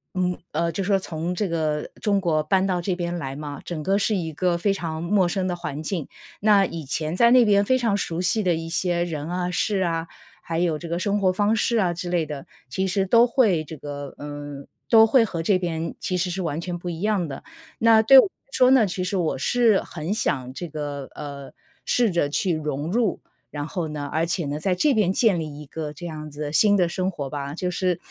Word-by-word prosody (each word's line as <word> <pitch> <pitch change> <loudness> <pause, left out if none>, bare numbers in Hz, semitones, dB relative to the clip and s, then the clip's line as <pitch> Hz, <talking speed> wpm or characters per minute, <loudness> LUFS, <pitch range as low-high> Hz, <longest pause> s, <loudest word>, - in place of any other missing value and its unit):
嗯， 180 -1 0
呃， 170 +2 0
就 195 - -2
说 195 +1 +2
从 170 -1 -4
这 195 +3 -1
个 155 -3 -1
中 205 -2 +2
国 160 -5 +1
搬 190 +5 +2
到 180 -2 0
这 180 0 -2
边 175 -1 -2
来 135 -5 -4
嘛， 145 0 -7
整 170 -3 -5
个 195 +6 +1
是 210 +2 +1
一 165 -3 -4
个 175 +2 +1
非 195 +3 +1
常 160 -4 -4
陌 190 +2 +2
生 185 0 -1
的 180 - -1
环 155 -4 -5
境。 165 -3 -3 0.4
那 205 -2 +5
以 165 -3 -6
前 155 +3 -2
在 235 +5 +5
那 250 -1 +7
边 200 -1 +4
非 255 +5 +2
常 230 -5 +1
熟 170 -4 -2
悉 185 +4 +1
的 180 -2 +2
一 165 0 -5
些 175 0 0
人 155 -2 -5
啊、 180 0 -2
事 190 +2 0
啊， 165 -1 -1 0.3
还 165 0 -3
有 170 -3 +1
这 170 - -7
个 170 +1 -2
生 205 +2 0
活 190 -2 +3
方 205 +3 +2
式 230 +1 +1
啊 185 -5 +2
之 175 +1 -5
类 175 -2 +1
的， 145 -2 -7 0.2
其 190 +9 -1
实 190 +1 +1
都 230 +5 +5
会 220 - +2
这 160 - -8
个 145 -1 -7
嗯， 145 -1 -7 0.2
都 225 -1 +8
会 230 +1 +4
和 170 -6 -4
这 190 +2 +3
边 165 -2 -3
其 185 - -2
实 180 +1 0
是 185 +2 -3
完 160 -3 -2
全 175 0 -4
不 175 +1 -6
一 165 -1 -5
样 205 -4 +1
的。 135 -2 -8 0.4
那 225 -1 +6
对 265 +5 +9
我 - - +6
来 - - -5 0.2
说 255 -2 +4
呢， 260 -4 +6
其 185 -1 -3
实 190 - -2
我 170 -6 0
是 225 - +3
很 165 +3 -4
想 130 - -1
这 175 +6 -5
个 145 -3 -5
呃， 140 -2 -8 0.3
试 240 -4 +2
着 170 -4 +1
去 175 +5 0
融 150 0 -3
入， 225 -2 0 0.3
然 145 -1 -4
后 170 -1 -3
呢 150 -2 -5
而 160 +1 +1
且 170 -1 -2
呢， 145 +1 -3
在 180 +3 0
这 290 +10 +3
边 205 -5 +2
建 200 -5 +3
立 150 -2 -6
一 - - -9
个 150 +1 -6
这 160 +4 -9
样 155 -2 -7
子 145 +1 -10
的 145 -1 -3
新 205 +5 +5
的 180 -3 +2
生 185 +1 -1
活 145 -7 -5
吧， 140 0 -5
就 180 +1 -2
是 180 -1 0
175 Hz, 260 characters per minute, -24 LUFS, 155-195 Hz, 0.4 s, 对